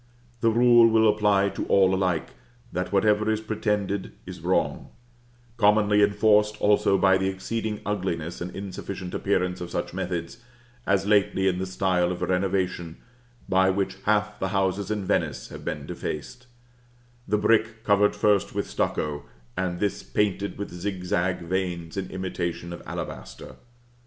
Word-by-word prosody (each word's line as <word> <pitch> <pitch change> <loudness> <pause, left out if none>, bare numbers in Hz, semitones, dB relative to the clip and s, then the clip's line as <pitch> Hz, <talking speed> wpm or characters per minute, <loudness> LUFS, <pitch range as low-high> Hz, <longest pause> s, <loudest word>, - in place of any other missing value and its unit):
The 115 - +3
rule 120 0 +6
will 110 0 +4
apply 105 -2 +3
to - - -4
all 95 -1 +4
alike, 90 -4 0 0.4
that 90 0 -3
whatever 105 +2 +3
is 110 -1 +1
pretended, 105 -2 -2
is - - -9
wrong; - - 0 0.7
commonly 105 -1 +4
enforced 105 +1 +3
also 105 -1 +3
by 95 -1 +4
the 95 - 0
exceeding 105 +3 -3
ugliness 90 -5 -3
and 90 - -3
insufficient 95 -1 -6
appearance 90 -2 0
of 90 - -5
such - - -3
methods, 90 +1 -4 0.5
as 95 0 +2
lately 100 -2 +2
in 90 -1 +1
the 95 - -2
style 90 -2 +1
of 90 - -4
renovation 90 -3 -1 0.5
by 95 0 +3
which 95 0 -1
half 105 0 +1
the 95 - -1
houses 95 +1 0
in 105 -2 -2
Venice - - -1
have - - -9
been - - -4
defaced, 125 +11 -6 0.8
the 105 - +2
brick 110 +1 +2
covered 105 0 +3
first 105 -1 +2
with - - -1
stucco, 75 -1 -2 0.3
and 90 -2 -2
this 100 -1 -1
painted 100 -1 -1
with 100 - -5
zigzag 90 -1 -2
veins 85 -2 -3
in 95 -1 -3
imitation 85 -2 -4
of 85 - -8
alabaster. - - -7
95 Hz, 145 wpm, -25 LUFS, 90-105 Hz, 0.8 s, rule